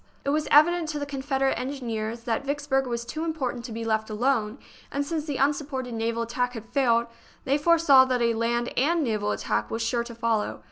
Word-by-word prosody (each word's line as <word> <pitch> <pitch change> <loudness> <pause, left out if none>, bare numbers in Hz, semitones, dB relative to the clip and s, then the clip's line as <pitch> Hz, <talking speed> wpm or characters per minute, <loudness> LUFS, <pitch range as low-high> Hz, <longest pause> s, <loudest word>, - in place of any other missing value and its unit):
It - - 0
was 305 +1 0
evident 325 +2 +5
to 305 - -3
the 290 - -3
Confederate 270 -1 -1
engineers 235 -4 -4
that 230 +2 -2
Vicksburg 280 -1 0
was 235 -1 -3
too 315 +6 -4
important 270 -7 -3
to 245 - -7
be 225 +1 -4
left 220 -1 0
alone, 225 0 0 0.3
and 285 0 -1
since 310 0 -3
the 290 -4 -3
unsupported 275 -3 -1
naval 230 +1 -1
attack 245 +2 -2
had 225 -2 -7
failed, 235 -2 +2 0.4
they 280 +2 +2
foresaw 310 -4 +6
that 255 -1 0
a 235 -1 +2
land 235 +1 -1
and 320 +5 +2
naval 215 -4 -1
attack - - -1
was 225 0 -2
sure 235 +1 0
to 235 0 -9
follow. 225 -2 -1
255 Hz, 200 wpm, -26 LUFS, 230-285 Hz, 0.4 s, foresaw